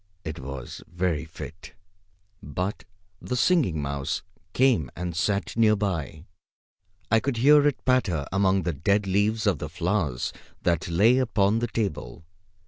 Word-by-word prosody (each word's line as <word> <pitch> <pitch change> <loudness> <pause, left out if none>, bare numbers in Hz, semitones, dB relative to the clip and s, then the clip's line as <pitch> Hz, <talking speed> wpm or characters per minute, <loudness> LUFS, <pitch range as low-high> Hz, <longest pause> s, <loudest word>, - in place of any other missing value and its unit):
It 80 +1 -5
was 65 -1 -7
very 85 -3 -1
fit. 80 +1 -10 0.7
But 90 +7 -4 0.4
the 125 - -3
Singing 120 - +2
Mouse 70 -1 -3 0.3
came 120 - +3
and 90 -1 -4
sat 100 +4 -1
near 110 -2 +4
by. 85 -6 -3 0.9
I 115 - +5
could 130 +1 -2
hear 145 +4 +6
it 145 - -2
patter 105 - +1
among 95 -1 +2
the 85 0 -1
dead 100 +8 +1
leaves 105 +3 +1
of 100 - +2
the 75 - -5
flowers 85 -6 -1 0.3
that 85 -2 +1
lay 105 +10 +4
upon 110 -3 +2
the 120 - -1
table. 85 - -4
95 Hz, 140 wpm, -26 LUFS, 80-110 Hz, 0.9 s, hear